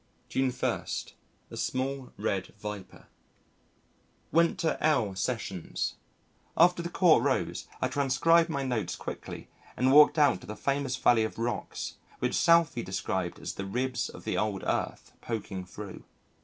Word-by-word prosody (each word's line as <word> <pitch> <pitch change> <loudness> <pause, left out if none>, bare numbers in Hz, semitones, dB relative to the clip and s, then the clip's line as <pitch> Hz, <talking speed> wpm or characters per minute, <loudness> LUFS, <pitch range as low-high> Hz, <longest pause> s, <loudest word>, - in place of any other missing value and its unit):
June 135 0 +1
1. 125 0 -1 0.7
A - - -7
Small 130 0 -2
Red 95 0 -2
Viper 105 -2 -8 1.3
Went 170 +1 +3
to 165 -2 -1
L 125 -10 +3
Sessions. 95 -4 -2 0.6
After 175 +1 +5
the 170 - -4
Court 175 -2 +5
rose, - - 0 0.2
I - - +3
transcribed 145 +5 +3
my 140 -3 -1
notes 125 -5 -1
quickly - - -7 0.3
and 130 +1 +3
walked 150 +3 +7
out 145 -11 +4
to - - -12
the 105 - -5
famous 140 +2 -1
Valley 120 -3 +4
of 110 - -4
Rocks 120 +1 -3 0.2
which - - -1
Southey 165 -7 +4
described 95 -3 -2
as - - -5
the 100 - -5
ribs 125 +4 -1
of - - -11
the - - -1
old 105 -3 -1
Earth - - -2
poking 100 -5 -4
through. 100 +1 -9
125 Hz, 145 wpm, -29 LUFS, 105-145 Hz, 1.3 s, walked